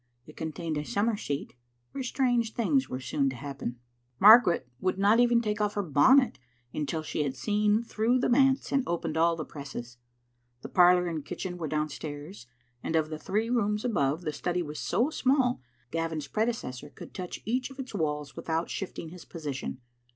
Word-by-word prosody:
It 155 - -14
contained 160 -1 -3
a - - -3
summer 210 +7 0
seat, 145 -8 -4 0.4
where 275 - -4
strange 245 -3 +1
things 265 +3 +1
were 130 - -3
soon 135 +1 0
to 130 - -6
happen. 135 -2 -5 0.4
Margaret 205 - +7
would 185 +3 0
not 205 +4 +4
even 240 -1 +4
take 210 -1 -1
off 210 0 0
her 205 - 0
bonnet 245 - +4 0.3
until 155 +1 -2
she 155 - -2
had 140 -2 -1
seen 210 - +1
through 230 +2 +1
the 255 - +1
manse 270 +2 +3
and 275 - +3
opened 165 -2 -2
all 165 +1 +3
the 155 -2 -5
presses. 130 -5 -8 0.7
The - - -6
parlour 180 0 +5
and 165 -4 -3
kitchen 180 +3 -5
were 160 - -2
downstairs, 150 0 -4 0.3
and 165 - -2
of 155 -1 +2
the 155 - -4
three 215 +8 -1
rooms 210 -2 +1
above, 155 - +1
the 155 - -2
study 175 +3 -1
was 150 -1 -6
so 235 - +1
small 260 - +2
that 120 -1 -38
Gavin's 160 -2 -2
predecessor 150 - -2
could - - -12
touch 180 -2 -6
each 250 +4 -1
of 270 - -13
its 260 -3 -7
walls 150 -6 -2
without 165 +1 -2
shift 195 - -5
ing 165 - -6
his 180 0 -11
position. 140 -5 -5
175 Hz, 190 wpm, -29 LUFS, 150-225 Hz, 0.7 s, Margaret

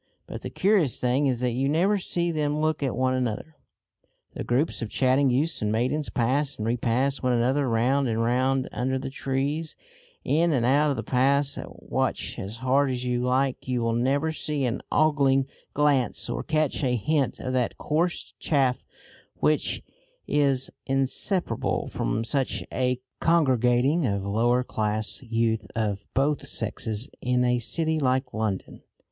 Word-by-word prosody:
But - - -7
the - - -5
curious 190 - +2
thing 130 +3 +2
is 125 -2 -1
that 125 -1 +1
you 130 +3 0
never 190 +7 +2
see 175 -1 -1
them 150 -2 0
look 155 -1 0
at 135 -3 -1
one 130 +1 +1
another. 130 +4 -3 0.8
The - - -5
groups 130 +5 0
of 115 - -3
chatting 130 +3 +3
youths 145 +7 +1
and 105 -1 0
maidens 130 +7 0
pass 135 +4 0
and 110 - -3
repass 125 +4 0
one 125 -1 +1
another 130 +3 +1
round 130 +4 +2
and 115 -1 -1
round 130 +2 +1
under 130 +2 -1
the 130 0 -5
trees, 140 +4 -2 0.5
in 165 +2 +2
and 120 -4 +1
out 145 +4 +3
of 140 - 0
the 115 - -4
paths, 140 +2 +2
and - - -6
watch - - -2
as 100 +4 -5
hard 135 +2 +3
as 125 -1 -3
you 125 -1 0
like 130 +1 0
you 125 -2 0
will 115 0 +1
never 140 +6 +1
see 150 -3 -2
an 120 -1 -2
ogling 140 -3 +3 0.3
glance 145 -4 +2
or - - -2
catch 155 -3 0
a 125 -2 +2
hint 140 +5 0
of 130 - -3
that 125 -2 0
coarse 170 +4 -1
chaff 135 -5 +1 0.5
which 150 -1 +1 0.4
is 135 -3 +1 0.2
inseparable 135 - 0
from 110 - -1
such 135 +1 0
a 125 -1 0 0.2
congregating 135 -1 +3
of 100 -2 -1
lower 120 +5 +2
class 110 -2 -2
youth 115 -3 -1
of 105 -3 -2
both 145 +2 +1
sexes 110 +2 -2
in 125 0 +1
a 125 0 +2
city 160 +6 0
like 130 -1 0
London. 110 -4 -3
130 Hz, 165 wpm, -26 LUFS, 120-145 Hz, 0.8 s, chatting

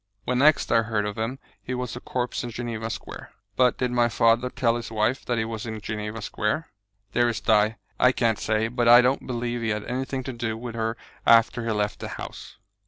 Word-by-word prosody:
When 125 0 0
next 150 +2 +4
I 115 - +5
heard 110 -2 -1
of 105 -1 -3
him 115 +4 -2 0.2
he 125 - -4
was 125 -1 -4
a - - -5
corpse 125 0 -3
in 120 - -4
Geneva 115 -1 -4
Square." - - -8 0.2
"But 125 -1 +3
did 125 -1 -1
my 120 -1 +3
father 115 +2 +3
tell 115 -2 +1
his 120 -1 -5
wife 110 +4 0
that 120 - 0
he 110 - 0
was 115 +1 -5
in 110 -1 -5
Geneva 105 +1 -5
Square?" 105 +13 -2 0.4
"Dearest 120 -1 +1
Di, 110 0 +4 0.2
I 125 - +6
can't 115 -4 +1
say; 110 0 +1
but 120 0 0
I 120 +1 +9
don't 125 +2 0
believe 120 -1 -2
he 115 - -1
had 105 -1 -1
anything 130 +1 -3
to 130 - -5
do 115 -2 -3
with 120 0 -6
her 115 0 -2 0.3
after 115 +1 +5
he 115 - -1
left 105 -1 -1
the - - -5
house." - - -8
115 Hz, 220 wpm, -25 LUFS, 110-125 Hz, 0.4 s, I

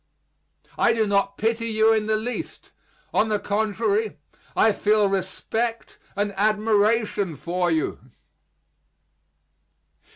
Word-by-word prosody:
I 235 - +4
do 225 -1 +1
not 200 -1 0
pity 230 +1 0
you 220 0 +3
in 215 -1 0
the 220 - +2
least. 240 +3 -6 0.4
On 220 - +2
the 210 - +1
contrary, 210 0 -1 0.4
I 220 - +4
feel 210 0 +2
respect 220 +5 -3 0.2
and 205 0 -1
admiration 210 -2 +1
for 175 +4 -1
you. 160 -2 -1
215 Hz, 105 wpm, -24 LUFS, 200-220 Hz, 0.4 s, I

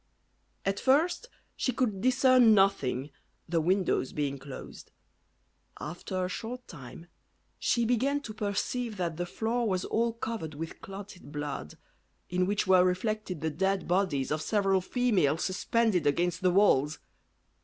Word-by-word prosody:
At 195 +1 0
first 325 - +2 0.3
she 255 - 0
could 220 -6 -1
discern 255 -2 +5
nothing, 145 -9 +1 0.4
the 165 -1 +1
windows 185 -4 +1
being 140 -2 -2
closed; 135 -1 -10 0.9
after 180 +3 -4
a - - -2
short 245 +6 -6
time 150 +1 -10 0.5
she 235 -1 +1
began 255 +5 +1
to 230 -6 -7
perceive 215 +2 -2
that 170 -3 -2
the 175 0 -2
floor 230 +4 -1
was 185 -1 -1
all 230 +1 0
covered 220 -9 -5
with 160 +2 -7
clotted 195 -4 -10
blood, 145 - -5 0.5
in 180 0 +1
which 205 +1 0
were 185 -1 +6
reflected 185 -1 -1
the 160 0 -1
dead 190 +2 0
bodies 175 -8 +1
of 155 0 0
several 195 0 +2
females 185 - +1
suspended 190 -3 +1
against 170 +4 +1
the 185 - +4
walls. 155 -6 +3
190 Hz, 140 wpm, -29 LUFS, 165-225 Hz, 0.9 s, were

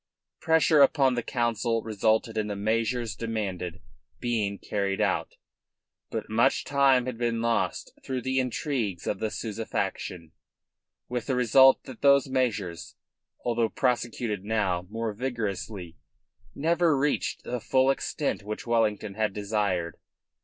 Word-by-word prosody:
Pressure 160 -2 +4
upon 135 -1 +5
the 120 - -1
Council 115 -2 0
resulted 110 +1 +1
in 110 -1 -1
the 105 - -3
measures 115 +1 -1
demanded 95 -5 -4 0.4
being 110 -5 -1
carried 100 -1 -2
out. - - 0 0.7
But - - -4
much 115 +5 +2
time 135 -3 +3
had 125 -3 -5
been 120 -1 0
lost 115 0 -1
through 130 -1 -3
the 130 +1 +1
intrigues 125 - -2
of - - -2
the 110 - -1
Souza 110 0 -4
faction, 85 -6 -4 0.8
with 125 -2 -4
the 130 - +1
result 130 +2 +6
that 130 -4 -11
those 140 -1 +5
measures, 110 - -2 0.5
although 115 -2 +1
prosecuted 120 -5 -1
now 95 -5 0
more 115 0 -3
vigorously, 105 -6 -4 0.6
never 165 0 +2
reached 145 +2 0
the 125 0 -3
full 130 +3 +3
extent 135 - -2
which 105 +1 -6
Wellington 110 -3 +1
had 110 -1 -1
desired. 100 -5 -1
115 Hz, 130 wpm, -27 LUFS, 105-130 Hz, 0.8 s, result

